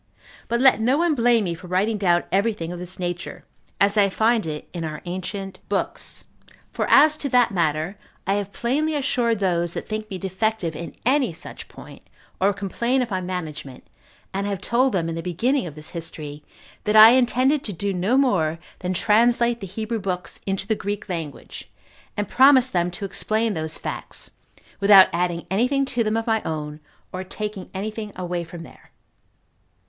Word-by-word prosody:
But 235 - 0
let 255 -4 +5
no 250 +5 +3
one 340 0 +2
blame 235 -4 +3
me 175 -3 -1
for 170 +2 -10
writing 200 +4 0
down 175 -3 +3
every 205 +4 +2
thing 165 -4 -6
of 175 - -6
this 180 0 -7
nature, 175 -1 -5 0.3
as 200 +2 +3
I 200 -1 +5
find 220 0 +1
it 150 -1 -5
in 170 -2 -4
our 155 -1 -5
ancient 185 +2 -5
books; - - -3 0.5
for - - -2
as 305 +2 +6
to 280 - -4
that 245 -3 +4
matter, 165 +1 -1 0.3
I 195 - +1
have 200 -1 -2
plainly 295 +9 -1
assured 245 -5 +1
those 175 -3 0
that - - -5
think 215 0 -4
me 190 - -4
defective 190 -2 -2
in 165 0 -7
any 260 - +2
such 160 - -9
point, - - -13 0.4
or 195 +2 +3
complain 235 +6 -1
of 235 - -7
my 185 -1 -1
management, 160 -7 -6 0.5
and 200 +1 -2
have 200 -2 -2
told 255 +5 +1
them 170 -4 0
in 165 - -3
the 165 - -4
beginning 185 - 0
of 150 - -9
this 155 0 -11
history, 150 -3 -7 0.4
that 210 - +1
I 220 +1 +11
intended 260 +3 +3
to 210 - -3
do 200 +2 -2
no 190 +8 +1
more 180 - +2 0.2
than 185 0 -2
translate 235 +4 +4
the 195 - -6
Hebrew 220 +4 -3
books 180 -2 -4
into 195 0 -1
the 220 - +1
Greek 205 -1 -4
language, 165 -6 -6 0.5
and 205 -1 -1
promised 260 -1 +5
them 175 -1 +1
to 200 +3 -5
explain 215 +3 0
those 160 -2 -3
facts, - - -6 0.5
without 200 -1 +8
adding 175 0 -1
any 220 +6 +2
thing 275 0 +1
to 245 -3 0
them 215 +1 0
of 225 - -2
my 220 -1 +1
own, 150 -1 -5 0.3
or 185 +1 -4
taking 205 0 -6
any 205 +3 -3
thing 215 -1 -6
away 175 -1 -3
from 165 0 -9
there. - - -16
200 Hz, 190 wpm, -23 LUFS, 175-230 Hz, 0.5 s, I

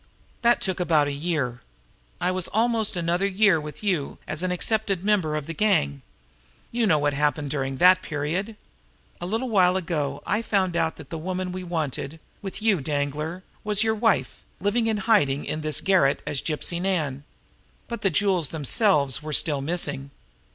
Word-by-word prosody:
That 240 0 +4
took 190 -2 0
about 160 -4 +3
a - - -1
year. 140 -5 -2 0.6
I 180 - +1
was 185 -1 -1
almost 225 -1 +1
another 175 +3 +1
year 195 -4 +3
with 150 +6 -8
you 180 -9 -1
as 155 - -3
an 185 - 0
accepted 195 0 -1
member 185 -8 +2
of 150 -2 -3
the 165 - -5
gang. 70 - +1 0.7
You 235 -1 +1
know 160 -5 +4
what 145 0 +1
happened 145 0 0
during 135 -2 -2
that 185 +3 +6
period. 170 +9 -3 0.7
A 175 - -3
little 225 +6 -1
while 185 -4 +4
ago 150 -6 -2
I 210 - 0
found 190 -5 0
out 160 -1 +1
that - - -12
the 165 - -4
woman 185 +2 -3
we 185 0 -5
wanted 160 -3 -3 0.2
with 195 +1 -5
you, 205 -8 +3
Danglar 150 +5 -3 0.2
was 210 0 +2
your 220 0 +2
wife, 220 -2 0 0.2
living 220 +4 +1
in 220 -1 +1
hiding 145 -12 +3
in 155 - -3
this 155 -1 -1
garret 180 -8 +3
as 145 -2 -1
Gypsy 170 +2 -2
Nan. 155 -8 -1 0.6
But 235 - -5
the 195 - +3
jewels 180 -3 +2
themselves 150 - +2
were 155 0 -5
still 145 -1 +3
missing. 145 -3 -2
175 Hz, 175 wpm, -25 LUFS, 150-200 Hz, 0.7 s, that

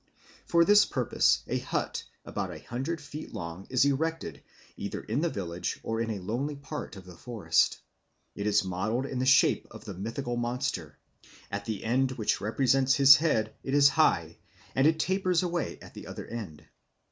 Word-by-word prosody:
For 170 0 +4
this 205 +2 +7
purpose 125 -3 +1
a - - -1
hut - - -3 0.2
about - - -3
a - - -7
hundred 135 +8 -3
feet 150 +1 -9
long 85 +3 -6
is 130 +1 +3
erected 140 - -1 0.3
either 100 - -5
in 115 +7 -1
the 170 - +1
village 90 - -4
or 115 0 -2
in 115 - -2
a 110 - -2
lonely 125 +10 -3
part 140 -2 -7
of 95 -1 -11
the 90 -1 -12
forest. 115 +4 +1 0.6
It 100 - -3
is 105 0 +3
modelled 105 +8 -1
in 135 -2 -4
the 130 - 0
shape 140 +1 +4
of - - -12
the - - -6
mythical 120 +6 -4
monster; 120 - -3 0.5
at 100 0 -4
the 110 -3 -4
end 130 +3 +1
which 115 -5 -1
represents 130 +4 +2
his 140 -1 +9
head 110 -9 0
it 135 - -2
is 140 -1 +7
high, - - +2 0.3
and 135 +3 +4
it 160 0 +3
tapers 185 +1 +1
away 175 -1 -2
at - - -13
the - - -10
other - - -7
end. 100 -11 -7
125 Hz, 180 wpm, -29 LUFS, 105-140 Hz, 0.6 s, his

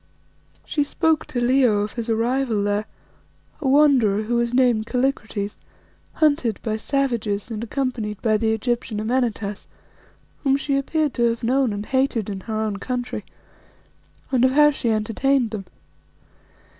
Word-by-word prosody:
She 295 - 0
spoke 315 +2 +1
to 245 - -3
Leo 240 -4 +3
of 210 0 -3
his 235 -1 -4
arrival 230 -1 +1
there, 205 +1 0 0.8
a 285 - -1
wanderer 260 -8 +4
who 225 +3 -3
was 235 0 +1
named 245 -3 +2
Kallikrates, 230 -6 -2 0.5
hunted 285 -8 +1
by 220 -2 -1
savages 235 -4 -1
and 220 0 -4
accompanied 235 -5 -3
by 215 -2 +2
the 220 0 +1
Egyptian 225 -1 -2
Amenartas, 220 -3 -2 0.8
whom 275 -1 +3
she 280 0 -1
appeared 295 +1 0
to 235 -1 +2
have 230 +1 -4
known 255 +1 +2
and 205 +1 -4
hated 260 -5 0
in 195 - -5
her 220 +3 -5
own 210 -2 -2
country, 245 0 -4 1.1
and 255 -2 +2
of 260 0 +4
how 295 +1 +6
she 260 -4 -2
entertained 225 +3 +1
them. 205 -3 -5
235 Hz, 145 wpm, -22 LUFS, 215-265 Hz, 1.1 s, how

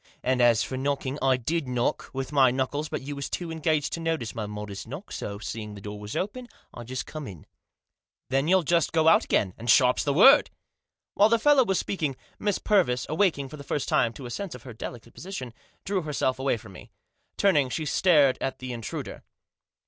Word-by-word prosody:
And 130 0 +1
as 115 -2 +5
for 130 - -5
knocking, 140 +1 -2
I 130 -1 +3
did 150 +4 -2
knock, 125 -1 -1
with 135 +1 -4
my 135 -3 +5
knuckles; 135 +4 -2
but - - -4
you 145 +1 -5
was 140 -1 -5
too 175 - -3
much - - -4
engaged 155 -2 0
to - - -3
notice 165 -9 -2
my 110 -2 -4
modest 105 -1 -7
knock; - - -8
so, 100 0 -5
seeing 105 0 -6
the - - -9
door 105 +1 -7
was 105 +1 -7
open, 240 +6 -3 0.3
I 120 - -8
just 125 +1 -4
come 155 -3 -7
in." 90 -6 -11 0.4
" - - -62
Then 135 +3 +1
you'll 185 0 +4
just 170 0 +1
go 160 -1 +3
out 165 - +6
again; 95 -3 +1
and 120 +2 -5
sharp's 125 +3 +5
the 145 - 0
word." 265 - +7 0.6
While 210 +2 +5
the 230 - +4
fellow 280 +2 +5
was 195 -5 0
speaking, 155 -8 -2 0.2
Miss 205 -2 0
Purvis, 125 - +2
awaking, 155 -4 +1
for 150 - -9
the 140 - -9
first 145 0 -2
time, 115 - +2
to 135 - -10
a 120 - -7
sense 195 +1 -5
of 125 - -12
her 125 - -9
delicate 115 +1 -8
position, 160 -10 -7 0.3
drew 195 -1 0
herself 135 -4 -1
away 135 -2 +1
from 110 -2 -13
me. 90 - -13 0.5
Turning, 150 -10 +3
she 155 +5 -3
stared 150 -4 +4
at 135 - -2
the 130 -1 -6
intruder. 115 -2 -6
135 Hz, 215 wpm, -26 LUFS, 120-165 Hz, 0.6 s, word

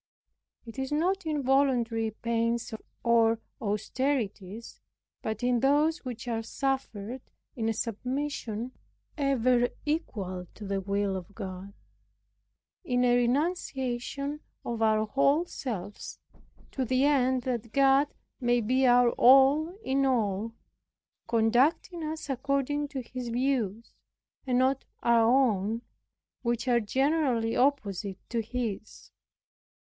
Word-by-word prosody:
It 230 +3 -9
is 265 +1 -3
not 350 +4 0
in 300 -3 -1
voluntary 250 -4 +2
pains 230 +1 -1 0.3
or 230 -1 +4 0.2
austerities, 220 -1 -2 0.4
but 220 +2 -4
in 245 -1 +2
those 295 +5 +3
which 245 -2 -6
are 230 -1 -1
suffered 255 -2 -3 0.3
in 225 -2 -1
a - - +1
submission 245 0 -3 0.4
ever 255 -4 +2 0.2
equal 195 - -3
to 210 - -9
the 195 0 -1
will 200 0 -1
of 185 +2 -8
God, 195 -1 -7 1.1
in 250 -6 +1
a 245 -1 +4
renunciation 275 0 -1 0.3
of 235 -1 -3
our 215 -1 +3
whole 275 +8 +2
selves, 210 - -6 0.5
to 265 - -2
the 255 +2 +2
end 260 -3 +2
that 235 -3 -3
God 275 +2 +4 0.3
may 245 -2 +2
be 255 +4 +2
our 245 -1 +5
all 275 +5 +6
in 275 +1 +1
all, 225 -3 0 0.7
conducting 260 +10 +2
us 310 0 -4
according 280 +2 -1
to 275 -3 -5
His 245 0 -6
views, 235 -3 -1 0.5
and 250 -1 +2
not 260 +1 +2 0.2
our 235 0 +5
own, 230 -3 +2 0.6
which 240 +1 -1
are 240 -1 +4
generally 255 -1 +1
opposite 210 -8 0
to 235 -1 0
His. 225 -2 -5
245 Hz, 115 wpm, -28 LUFS, 225-275 Hz, 1.1 s, all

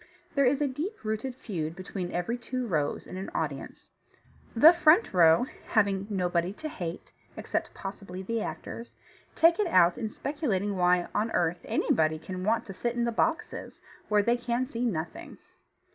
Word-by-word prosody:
There 280 -2 +4
is 275 +3 +2
a 290 - +3
deep 315 - -5
rooted 220 +4 -3
feud 165 -10 -4
between 185 -1 -5
every 180 +7 -1
two 250 +1 -4
rows 155 -9 -1
in 185 - -8
an 190 - -5
audience. - - -4 0.6
The 305 +9 +9
front 340 - +4
row, 170 +4 +6 0.2
having 200 -3 +1
nobody 180 -2 0
to 310 +8 -6
hate 175 - -6 0.3
(except - - -3
possibly 195 -1 -7
the 230 +3 -2
actors), 230 +2 -6 0.4
take 335 +2 +5
it 420 - +2
out 175 - +4
in 220 -3 -2
speculating 215 - -2
why 180 -1 +3
on 215 +2 0
earth 175 +1 +1
anybody 155 0 +1
can 185 +3 -6
want 225 +3 +1
to 195 - -8
sit 235 +5 -2
in 240 - 0
the 235 - 0
boxes, 325 +8 -2 0.3
where 210 -1 +4
they 235 +3 +2
can 240 +1 -1
see 245 -2 -4
nothing. 170 -7 -4
210 Hz, 170 wpm, -28 LUFS, 180-250 Hz, 0.6 s, The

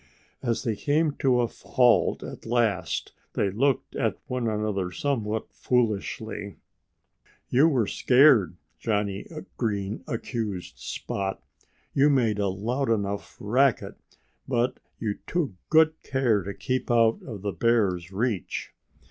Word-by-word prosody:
As 120 -2 -1
they 115 -3 0
came 150 +6 +1
to 125 -2 +3
a - - +3
halt 120 +1 +2
at - - -8
last 110 -8 0 0.2
they 100 - +1
looked 135 +6 0
at - - 0
one 125 -2 -2
another 105 -4 -1
somewhat 110 -4 -2
foolishly. 110 -3 -1 0.9
"You 140 +6 +5
were 130 -9 +2
scared," 125 - +4 0.2
Johnnie 100 -3 -1 0.3
Green 105 -3 -2
accused 110 -5 -4
Spot. 95 -1 -4 0.5
"You 140 +2 +5
made 115 -7 +2
a 100 - +1
loud 115 +8 -1
enough 100 -2 -2
racket; 125 +5 +1 0.5
but 125 0 0 0.2
you 105 -3 -3
took 165 -8 0 0.2
good 160 0 +4
care 125 -6 +1
to 100 +2 -5
keep 130 +6 -2
out 115 -1 +4
of 105 -6 -8
the 100 -2 -2
bear's 100 -7 +1
reach." 105 - -2
115 Hz, 125 wpm, -26 LUFS, 100-130 Hz, 0.9 s, You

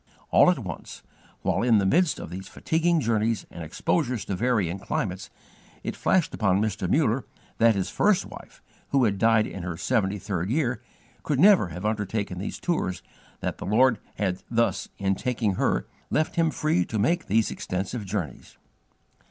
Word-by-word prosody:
All - - +7
at - - +2
once, - - -7 0.4
while - - +1
in 115 -2 +4
the 100 - +2
midst 165 - +3
of - - -8
these 95 +2 -7
fatiguing 165 +1 +1
journeys 115 -2 0
and 85 - -7
exposures 120 - -1
to 95 - -2
varying 100 -4 0
climates, 95 -1 -3 0.5
it - - -3
flashed 185 -4 +1
upon 100 -3 +2
Mr. 100 -4 -1
Muller 135 - +2 0.4
that 115 -1 +5
his 95 -2 -2
first 205 -2 +2
wife, - - -12 0.3
who 135 -2 +3
had 100 -4 +1
died 115 0 +4
in 95 - -6
her 85 -1 -4
seventy 105 -2 0
third 95 -2 -3
year, 125 -4 0 0.4
could 145 -4 -1
never 195 - +6
have 90 +4 -7
undertaken 105 -3 -2
these 100 - -5
tours, 160 - -1
and - - -28
that - - -3
the - - -5
Lord 120 +3 +4 0.2
had 95 -2 -1
thus, 115 0 0
in 95 0 +1
taking 115 -1 -1
her, - - 0 0.2
left 155 +1 0
him 165 -1 +3
free 155 - +1
to 110 - -3
make 165 - +1
these 110 +2 +2
extensive 95 +5 -3
journeys. 95 - -5
110 Hz, 175 wpm, -26 LUFS, 95-125 Hz, 0.5 s, All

